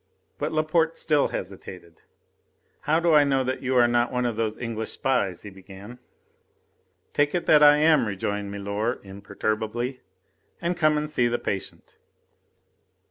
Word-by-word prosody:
But 150 +2 -2
Laporte 160 +1 +1
still 150 -3 +2
hesitated. 90 -3 -8 0.9
"How 160 +2 +4
do 170 -1 +2
I 150 -1 +7
know 135 -2 +1
that 130 +1 -3
you 130 0 -1
are 120 -1 +5
not 120 0 +1
one 125 0 -1
of 120 -2 -1
those 110 -1 -2
English 115 -2 -4
spies?" 100 -10 -1
he 100 - -9
began. 95 +5 -12 1.1
"Take 145 +3 +1
it 175 - -1
that 150 - +5
I 150 0 +7
am," 155 -5 +4
rejoined 100 0 -3
milor 100 +4 -3
imperturbably, 110 +5 -4 0.6
"and 170 +1 -1
come 155 -3 +2
and 150 0 -2
see 125 -5 +1
the 120 0 0
patient." 100 -4 -6
120 Hz, 150 wpm, -25 LUFS, 100-150 Hz, 1.1 s, I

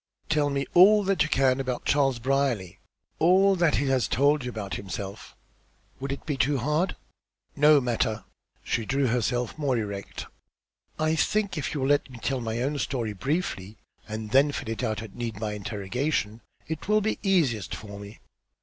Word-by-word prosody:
"Tell 150 -2 +2
me 140 -1 -1
all 205 +4 +7
that 195 0 +1
you 150 - +2
can 135 -2 +3
about 130 -2 -3
Charles 135 -3 +2
Brierly, 125 -7 -1 0.4
all 190 +4 +5
that 170 -4 +2
he 140 - +1
has 130 -3 +2
told 140 +3 +2
you 125 - -3
about 105 -5 -5
himself. 95 +1 -6 0.6
Will 135 +1 -4
it 140 - -5
be 145 -4 -2
too 140 +2 +2
hard?" 150 +8 0 0.6
"No 150 0 +6
matter." 115 -3 -1 0.4
She 115 - -1
drew 135 +5 0
herself 125 +2 -1
more 135 -4 +1
erect. 100 -3 -5 0.7
"I 155 +1 +1
think 200 +4 0
if 150 -2 -3
you 145 - -2
will 135 - 0
let 145 -1 +2
me 125 - -10
tell 130 +2 -2
my 115 +1 -2
own 145 +2 -1
story 115 -7 -2
briefly, 110 - -3 0.3
and 110 0 -6
then 140 +2 +5
fill 115 - -5
it 115 - -3
out 115 -2 -2
at 110 - -10
need, 115 -4 -5
by 105 -1 -2
interrogation, 105 +3 -2 0.3
it 160 +1 -5
will 215 +1 +3
be 220 +1 -1
easiest 160 - +1
for 100 -1 -9
me." 100 +2 -10
130 Hz, 180 wpm, -26 LUFS, 110-150 Hz, 0.7 s, all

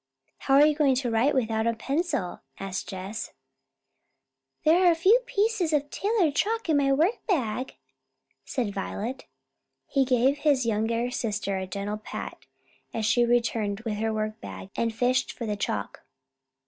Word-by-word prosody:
"How 270 - +2
are 290 +2 +8
you 305 - +4
going 290 -3 +3
to 250 -2 -1
write 240 +6 +2
without 225 -3 +1
a 230 - +1
pencil?" 270 - -2 0.2
asked 195 -1 -4
Jess. 195 +3 -6 1.3
"There 350 +4 +5
are - - +2 0.3
pieces 415 -7 +1
of 290 -1 0
tailor's 400 -7 +1
chalk 445 +8 0
in 305 - +4
my 275 -1 +3
workbag," 275 - 0 0.7
said 230 -6 -2
Violet. 220 +6 -4 0.7
Henry 275 -2 +4
gave 255 +3 +2
his 285 -4 +2
younger 230 +2 0
sister 205 -5 -2
a 190 - -4
gentle 200 +2 -4
pat, 215 - -8 0.5
as 220 - -1
she 240 +2 +3
returned 225 -4 +1
with 220 -2 -3
her 220 +1 0
workbag 215 -2 -5
and 230 0 0
fished 245 +3 +1
for 235 - -6
the 210 -1 -1
chalk. 105 - -3
240 Hz, 145 wpm, -27 LUFS, 215-290 Hz, 1.3 s, are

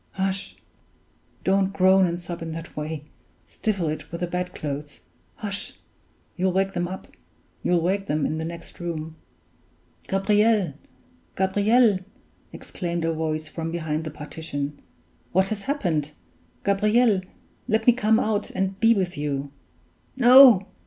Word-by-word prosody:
hush! 190 0 -2 0.9
Don't 195 0 +2
groan 190 0 +5
and 170 0 -3
sob 175 -1 -7
in 165 -1 -5
that 165 +1 -8
way! 150 0 -4 0.4
Stifle 195 -6 -2
it 155 0 -5
with 170 - -6
the - - +1
bedclothes. 150 -5 -5 0.3
Hush! 200 -1 -4 0.6
you'll 185 +1 +1
wake 195 +1 +1
them 175 0 -1 0.8
in 175 -3 0
the - - -3
next 170 0 -9
room!" 160 -2 -5 0.9
"Gabriel 205 -2 +2 0.6
Gabriel!" 205 +3 +3 0.5
exclaimed 170 -3 -4
a 165 - +1
voice 155 -1 -2
from 165 -1 -5
behind 160 -2 -2
the 155 - -4
partition. 150 -1 -6 0.5
"What 190 +2 +3
has 215 -2 -3
happened? 160 - -1 0.5
Gabriel! 210 +1 +3 0.5
let 220 +1 +1
me 245 - +7
come 220 -1 +3
out 215 -3 -1
and 190 0 -2
be 230 +1 +5
with 185 -3 -1
you!" 145 -2 -3 0.7
"No! 245 -5 +8
180 Hz, 125 wpm, -24 LUFS, 160-200 Hz, 0.9 s, No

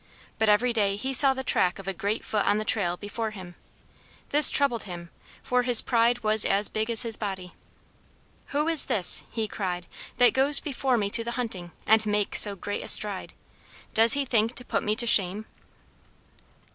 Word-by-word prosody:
But 220 -1 0
every 235 +4 +1
day 200 -3 -1
he 260 +6 -5
saw 270 +1 +4
the 265 - -6
track 180 -7 0
of 195 -1 -13
a 195 - -4
great 200 +5 -5
foot 210 -2 -2
on 205 - +1
the 215 - -5
trail, 180 -5 -1
before 215 +3 -6
him. 185 -4 -12 0.8
This 295 0 +5
troubled 275 -6 0
him, 175 -3 -11 0.3
for 250 0 -1
his 245 -2 +6
pride 240 0 -1
was 215 0 +3
as 200 +1 +3
big 220 +1 -4
as 230 +1 +4
his 230 -2 -3
body. 190 -4 -7 0.9
"Who 295 +2 -3
is 330 -2 +3
this," 180 -4 +2
he 220 -2 -5
cried, 180 -4 -6 0.3
"that 245 -1 +3
goes 275 +2 +4
before 270 -3 -3
me 200 -2 -3
to 230 +1 +2
the 235 +1 -6
hunting, 190 -8 -6
and 220 0 +2
makes 210 -1 +1
so 205 -2 +2
great 205 +2 -7
a - - -10
stride? 205 -3 +2 0.6
Does 225 +1 +6
he 280 0 -1
think 230 -1 -1
to 250 - -7
put - - -3
me 210 0 -2
to 240 +1 -2
shame?" 205 -1 +2
220 Hz, 195 wpm, -24 LUFS, 200-245 Hz, 0.9 s, his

